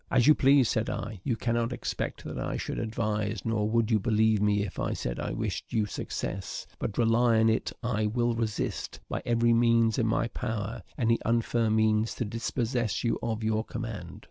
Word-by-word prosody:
"As 125 -3 +3
you 155 - +8
please," 135 -3 +5
said 110 0 0
I; 110 -5 -5
"you 125 - 0
cannot 115 +1 0
expect 125 - -4
that - - -5
I - - -2
should - - -3
advise, 110 -1 -2
nor 110 -2 0
would 115 0 +1
you 110 - +4
believe 110 0 +2
me 105 0 +2
if 100 - -7
I - - -1
said - - -3
I - - -2
wished - - -3
you 110 -2 +2
success; 95 -1 -4
but 100 - -3
rely 115 0 +4
on 110 0 +4
it 110 - 0
I 110 -3 0
will 120 +2 +1
resist, 115 -2 -3
by - - -3
every 120 0 +3
means 115 0 +3
in 115 - +2
my 110 +1 +1
power, 110 -2 -4 0.2
any 115 -3 +2
unfair 115 0 +1
means 110 0 +2
to 120 - -2
dispossess 115 0 -1
you 115 - 0
of 115 -1 -2
your 110 0 +1
command." 110 -7 -6
115 Hz, 195 wpm, -28 LUFS, 110-120 Hz, 0.2 s, you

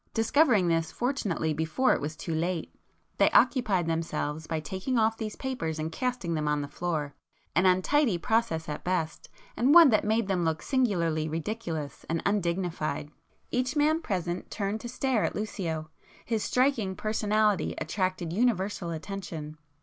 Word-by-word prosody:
Discovering 225 - +4
this 165 -1 +1
fortunately 205 - -1
before 160 - +2
it - - -1
was 155 +2 -4
too 165 +2 -4
late, 170 +1 -2 0.5
they - - +6
occupied 240 - +3
themselves 160 -1 -2
by 160 - -1
taking 190 - -3
off 225 0 +3
these 215 -2 -5
papers 245 - -3
and 155 +1 -3
casting 250 -7 -2
them 155 -2 -1
on 150 0 +1
the - - -5
floor,—an 155 +2 -3
untidy 190 - +3
process 220 -5 0
at 150 - -5
best, 165 -4 -2 0.3
and 265 +7 +4
one 335 -4 +10
that 215 - +3
made 220 0 +1
them 185 -3 0
look 160 -1 -1
singularly 170 - +1
ridiculous 165 -3 -4
and 165 0 0
undignified. 170 -6 -1 0.4
Each 255 +3 0
man 305 +2 +3
present 180 - -3
turned 205 +1 -2
to 240 - -6
stare 255 -2 0
at - - -1
Lucio; 165 -7 -3 0.3
his 225 -3 -1
striking 250 -7 +1
personality 215 -1 +1
attracted 185 0 -2
universal 200 -5 0
attention. 160 -3 -6
185 Hz, 150 wpm, -28 LUFS, 160-225 Hz, 0.5 s, one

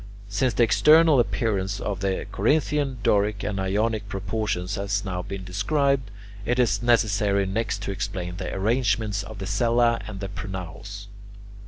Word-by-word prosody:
Since 105 +3 0
the 120 - +4
external 150 - +6
appearance 100 -5 0
of 100 -3 -3
the 95 -1 -1
Corinthian, 145 +3 +1
Doric, 105 0 +2
and 100 -2 -2
Ionic 105 +2 -1
proportions 95 -1 -2
has 100 0 -1
now 90 -2 -3
been 100 0 -6
described, 130 +7 0 0.3
it 120 +3 0
is 105 -6 +2
necessary 105 -4 +2
next 105 +1 -2
to 100 - -3
explain 95 -3 -4
the - - -4
arrangements 105 -1 0
of 110 - -9
the 95 - -5
cella 115 +3 +2
and 100 -3 -7
the 100 - -4
pronaos. 100 +1 -7
105 Hz, 150 wpm, -25 LUFS, 95-115 Hz, 0.3 s, external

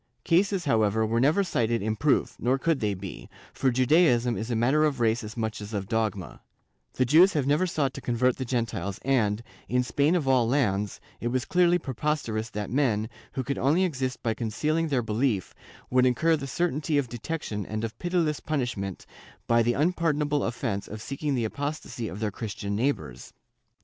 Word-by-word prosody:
Cases, 185 +1 +2
however, 110 -4 +2
were 115 +2 0
never 150 +10 +3
cited 115 - 0
in 110 +1 0
proof, 135 +6 +1
nor 130 +2 +2
could 160 +1 +1
they 105 -4 0
be, 95 0 -8 0.2
for 135 - +1
Judaism 125 -2 +3
is 110 +4 -4
a 120 - 0
matter 130 +7 +3
of 145 -4 +1
race 115 +1 +2
as 110 +2 -8
much 110 -2 -3
as 105 +1 -6
of 100 -1 -3
dogma; 110 -5 -2 0.5
the 130 - +1
Jews 165 +9 +6
have 145 -5 0
never 150 +6 +2
sought 140 -6 0
to - - -7
convert 125 +1 +1
the 130 - -3
Gentiles 115 -5 -2
and, 115 -5 +1 0.3
in 125 +1 +2
Spain 145 +6 +2
of 155 -6 0
all 130 -3 +4
lands, 105 -7 0 0.2
it 120 - -2
was 125 +2 -1
clearly 175 -1 +3
preposterous 130 -6 -2
that 105 -1 -5
men, 120 -5 +1 0.2
who 130 - -2
could 140 +2 -3
only 155 +8 +3
exist 130 -7 -2
by 115 - +1
concealing 150 +9 -1
their 135 -5 0
belief, 110 -2 0 0.4
would 130 0 +4
incur 160 +6 +3
the 140 -3 -5
certainty 155 0 0
of 140 -3 +1
detection 120 -3 -4
and 110 +1 -3
of 115 0 -5
pitiless 175 -4 0
punish 130 -7 -2
ment, 95 -2 -5 0.4
by 115 0 +4
the 120 +1 +2
unpardonable 150 -2 +1
offence 115 -4 -2
of 110 - -7
seeking 140 +4 -3
the 120 -3 0
apostasy 145 -2 -4
of 100 - -7
their 105 -1 -1
Christian 100 -1 -4
neighbors. 105 - -2
125 Hz, 190 wpm, -27 LUFS, 110-150 Hz, 0.5 s, Jews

